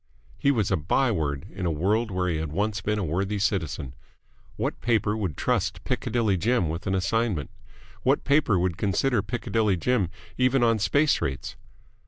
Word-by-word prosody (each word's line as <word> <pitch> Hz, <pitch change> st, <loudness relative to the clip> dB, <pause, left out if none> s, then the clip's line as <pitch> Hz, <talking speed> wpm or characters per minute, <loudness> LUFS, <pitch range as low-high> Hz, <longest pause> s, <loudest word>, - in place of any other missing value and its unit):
He 140 Hz, -, +2 dB
was 110 Hz, -9 st, +1 dB
a 95 Hz, -, +3 dB
by 115 Hz, -, +1 dB
word 70 Hz, -8 st, -2 dB
in 95 Hz, -2 st, -3 dB
a -, -, +1 dB
world 105 Hz, +9 st, +1 dB
where 90 Hz, -1 st, -1 dB
he 85 Hz, -3 st, 0 dB
had 80 Hz, -1 st, -3 dB
once 105 Hz, +5 st, -1 dB
been 105 Hz, 0 st, -1 dB
a 105 Hz, -, -1 dB
worthy 95 Hz, +6 st, -1 dB
citizen. 80 Hz, -, -1 dB, 0.6 s
What -, -, -3 dB
paper 110 Hz, -3 st, +1 dB
would 95 Hz, -10 st, -3 dB
trust -, -, 0 dB
Piccadilly 110 Hz, -4 st, 0 dB
Jim 110 Hz, -2 st, +1 dB
with 85 Hz, +5 st, -4 dB
an 95 Hz, -, +1 dB
assignment? 95 Hz, -, 0 dB, 0.5 s
What -, -, +2 dB
paper 140 Hz, -7 st, +3 dB
would 90 Hz, -1 st, 0 dB
consider 105 Hz, +4 st, +1 dB
Piccadilly 105 Hz, -2 st, 0 dB
Jim 105 Hz, -2 st, +1 dB, 0.3 s
even 125 Hz, 0 st, +3 dB
on 115 Hz, -2 st, +3 dB
space 145 Hz, +8 st, +2 dB
rates? 70 Hz, 0 st, -3 dB
100 Hz, 175 wpm, -26 LUFS, 85-115 Hz, 0.6 s, a